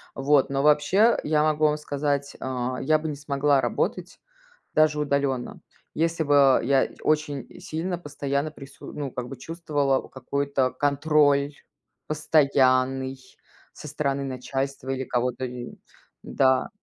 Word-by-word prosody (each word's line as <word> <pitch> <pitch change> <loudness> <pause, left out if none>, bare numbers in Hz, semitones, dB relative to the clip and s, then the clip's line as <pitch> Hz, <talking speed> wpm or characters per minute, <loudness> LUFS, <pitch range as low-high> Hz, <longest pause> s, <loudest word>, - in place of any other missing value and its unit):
Вот, 140 0 +3
но 140 0 -1
вообще, 150 +10 +4
я 150 0 +2
могу 155 0 +2
вам 150 0 +2
сказать, 145 -1 -2
а, 130 -1 -3
я 155 +3 +3
бы 160 - -5
не 150 - -3
смогла 140 -1 +1
работать, - - -2 0.5
даже 155 -1 +3
удаленно, 140 -3 -1 0.3
если 165 0 0
бы, 140 -2 +5
а, - - -3
я 135 +1 +2
очень 150 -3 -1
сильно 175 0 -3
постоянно 145 -1 -3
прису 140 -2 -12
ну, 140 -3 -4
как 125 0 -5
бы 135 - -8
чувствовала 145 -3 -1
какой-то 135 0 -1
контроль 145 +1 +2 0.5
постоянный 135 -3 +2 0.5
со - - -10
стороны 140 -2 -2
начальства 135 +1 -4
или 135 0 -2
кого-то 125 +1 -1
и 125 -1 -7 0.5
Да. 130 -1 +2
140 Hz, 130 wpm, -25 LUFS, 135-150 Hz, 0.5 s, бы